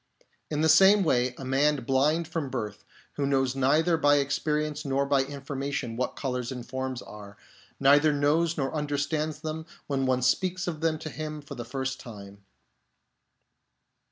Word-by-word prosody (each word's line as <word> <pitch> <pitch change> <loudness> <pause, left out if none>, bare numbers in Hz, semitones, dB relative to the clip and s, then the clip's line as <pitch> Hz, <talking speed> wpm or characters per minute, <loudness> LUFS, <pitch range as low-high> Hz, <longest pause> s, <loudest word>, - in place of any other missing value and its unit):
In 150 -1 -1
the 160 - +3
same 190 +6 +6
way, 125 -6 +1
a 135 - -7
man 140 +1 +2
blind 145 +6 +2
from 160 -4 -3
birth, 105 -5 -5 0.3
who 145 - 0
knows 135 -2 +1
neither 155 +6 +3
by 145 -2 +4
experience 150 +1 -1
nor 140 0 0
by 140 -1 +3
information 140 -3 -4
what 125 +2 -2
colours 125 -2 -3
and 125 -2 -7
forms 130 0 -4
are, 100 -1 -11 0.4
neither 145 +3 +5
knows 155 +4 +1
nor 135 -1 -1
understands 150 +1 -2
them 160 +1 -5 0.2
when 140 -2 -1
some 135 - 0
one 130 0 +1
speaks 185 +7 +1
of 160 -3 -4
them 160 -1 +1
to 155 0 -7
him 155 0 -5
for 145 -1 -10
the 120 -3 -6
first 130 +2 -3
time. 100 -4 -11
140 Hz, 165 wpm, -27 LUFS, 130-155 Hz, 0.4 s, same